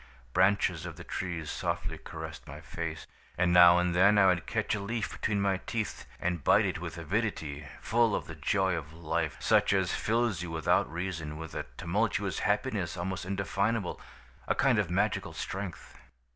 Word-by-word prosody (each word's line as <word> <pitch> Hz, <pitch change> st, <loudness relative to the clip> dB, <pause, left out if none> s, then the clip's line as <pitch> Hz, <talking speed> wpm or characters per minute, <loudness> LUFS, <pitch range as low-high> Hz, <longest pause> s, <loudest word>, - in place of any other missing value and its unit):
Branches 95 Hz, -3 st, +3 dB
of -, -, -7 dB
the -, -, -9 dB
trees 85 Hz, -4 st, -4 dB
softly -, -, -3 dB
caressed -, -, -8 dB
my 75 Hz, -, -8 dB
face, 80 Hz, +1 st, -5 dB, 0.3 s
and 90 Hz, 0 st, +3 dB
now 90 Hz, 0 st, +9 dB
and 90 Hz, 0 st, +1 dB
then 100 Hz, +4 st, +5 dB
I 100 Hz, -, +6 dB
would 90 Hz, -6 st, +2 dB
catch -, -, 0 dB
a 110 Hz, -, -1 dB
leaf 115 Hz, +3 st, -3 dB
between 105 Hz, -2 st, -1 dB
my 100 Hz, -1 st, +2 dB
teeth 110 Hz, -3 st, -3 dB
and 85 Hz, -4 st, -1 dB
bite -, -, +5 dB
it -, -, -2 dB
with -, -, -6 dB
avidity, 80 Hz, -, -2 dB
full 115 Hz, -1 st, +2 dB
of -, -, -3 dB
the 80 Hz, -, -8 dB
joy 95 Hz, +5 st, +1 dB
of 80 Hz, -2 st, -6 dB
life, 80 Hz, -1 st, -2 dB
such -, -, +3 dB
as 95 Hz, -2 st, +1 dB
fills 115 Hz, -4 st, +1 dB
you 90 Hz, -, -4 dB
without 80 Hz, -2 st, +1 dB
reason, 85 Hz, -3 st, -4 dB
with 80 Hz, 0 st, -7 dB
a -, -, -4 dB
tumultuous 100 Hz, +1 st, 0 dB
happiness 105 Hz, -4 st, 0 dB
almost 90 Hz, +1 st, -3 dB
indefinable, 100 Hz, +1 st, -1 dB, 0.5 s
a -, -, +2 dB
kind 125 Hz, -5 st, +3 dB
of 100 Hz, -5 st, 0 dB
magical 100 Hz, +4 st, 0 dB
strength. 95 Hz, -2 st, -6 dB
90 Hz, 175 wpm, -30 LUFS, 85-100 Hz, 0.5 s, now